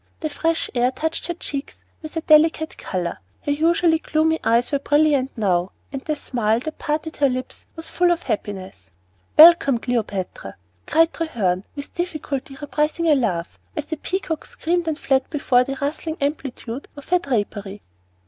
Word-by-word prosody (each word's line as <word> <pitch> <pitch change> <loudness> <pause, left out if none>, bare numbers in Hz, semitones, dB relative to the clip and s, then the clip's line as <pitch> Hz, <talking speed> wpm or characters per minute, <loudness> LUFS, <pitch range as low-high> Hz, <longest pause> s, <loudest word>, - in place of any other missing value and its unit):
The 310 -2 -2
fresh 330 +2 0
air 245 0 +3
touched 320 +5 -3
her 345 - -2
cheeks 280 -4 -6 0.2
with 310 0 -7
a - - 0
delicate 315 0 +4
color; 175 -2 -3 0.2
her 290 - -1
usually 325 +2 +3
gloomy 320 0 +1
eyes 235 +2 +2
were 280 - +1
brilliant 290 -2 +3
now, 185 -4 +1 0.2
and 275 - -3
the 305 +2 -2
smile 230 -6 0
that 315 +3 -6
parted 310 +1 -2
her 280 -1 +4
lips 255 0 -5
was 325 0 -6
full 355 0 +2
of 345 -1 +1
happiness. 195 -2 -4 0.5
"Welcome, 315 -5 +8
Cleopatra!" 210 - -3 0.3
cried 325 +1 +4
Treherne, 205 - -1
with 285 -1 -7
difficulty 295 -6 -4
repressing 300 +3 -1
a - - +7
laugh, 190 -11 -1 0.2
as 300 - -2
the 315 - -4
peacocks 335 -2 -3
screamed 345 +1 -1
and 315 -2 0
fled 265 -3 +1
before 260 -5 +3
the 270 +1 -5
rustling 315 +3 -3
amplitude 275 -3 -3
of 285 - -11
her 360 0 +4
drapery. 205 - -3
285 Hz, 165 wpm, -22 LUFS, 240-320 Hz, 0.5 s, Welcome